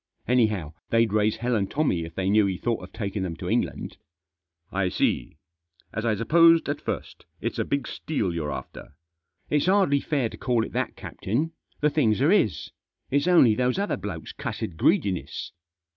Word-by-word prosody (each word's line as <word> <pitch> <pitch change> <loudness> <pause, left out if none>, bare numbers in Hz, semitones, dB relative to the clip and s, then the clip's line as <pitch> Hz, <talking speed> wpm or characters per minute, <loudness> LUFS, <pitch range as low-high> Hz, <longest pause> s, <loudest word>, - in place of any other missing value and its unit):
Anyhow, 110 -10 +1 0.2
they'd 115 -2 +2
raise 110 0 +2
hell 125 0 -1
and 100 -3 0
Tommy 95 - 0
if 80 0 -11
they 95 -1 -1
knew 105 -1 +4
he 95 -2 -2
thought 115 +2 -1
of - - -10
taking 100 -2 -3
them 90 -3 -3
to - - -7
England." - - -1 0.4
" 85 -1 -49
I 95 - +1
see. - - -1 0.6
As 110 +2 -3
I 110 - +2
supposed 165 +8 +5
at - - -2
first, - - -5
it's - - -3
a - - +2
big 140 -3 -2
steal 105 - -2
you're 80 -3 -2
after." 70 - -8 0.3
" 85 +3 -46
It's 150 +2 +2
hardly 185 -7 +4
fair 140 -6 0
to - - -10
call 120 -3 +1
it - - -9
that, - - -2
captain. 140 +12 -3 0.3
The 150 0 +3
things 115 -9 +2
are 145 +6 +4
his. 160 - +1 0.4
It's 140 +4 +2
only 165 -11 +6
those 125 +5 +1
other 200 +1 0
blokes' 95 -4 -6
cussed 85 - -5
greedi 150 - +3
ness." 90 - -6
110 Hz, 190 wpm, -26 LUFS, 95-140 Hz, 0.6 s, only